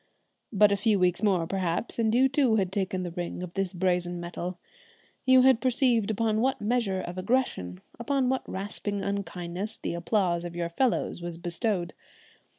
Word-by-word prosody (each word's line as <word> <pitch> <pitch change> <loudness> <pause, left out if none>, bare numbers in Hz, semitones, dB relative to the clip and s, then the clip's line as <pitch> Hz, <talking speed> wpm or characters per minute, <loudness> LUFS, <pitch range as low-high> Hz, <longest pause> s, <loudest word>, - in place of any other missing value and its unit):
But 210 -1 +5
a 200 - +2
few 210 0 +2
weeks 180 -1 +2
more 190 -6 +2
perhaps, 185 +5 -2
and 225 0 +2
you 260 +2 +5
too 265 -4 +2
had 190 -4 +1
taken 190 -1 -1
the 175 - -4
ring 175 +1 -5
of 175 -1 -7
this 195 -2 -1
brazen 180 -1 0
metal. 175 +1 -5 0.7
You 260 0 +7
had 260 -3 +5
perceived 250 -4 +2
upon 220 0 +1
what 265 +2 +1
measure 210 -4 0
of 175 +1 -6
aggression, 185 - -1 0.2
upon 265 +2 0
what 260 +1 +1
rasping 200 +1 -3
unkindnesses, 200 0 -4
the - - -4
applause 175 -1 0
of 175 -1 -6
your 170 -1 -2
fellows 225 -2 0
was 170 -1 -5
bestowed. 175 +1 -2
195 Hz, 170 wpm, -27 LUFS, 175-230 Hz, 0.7 s, You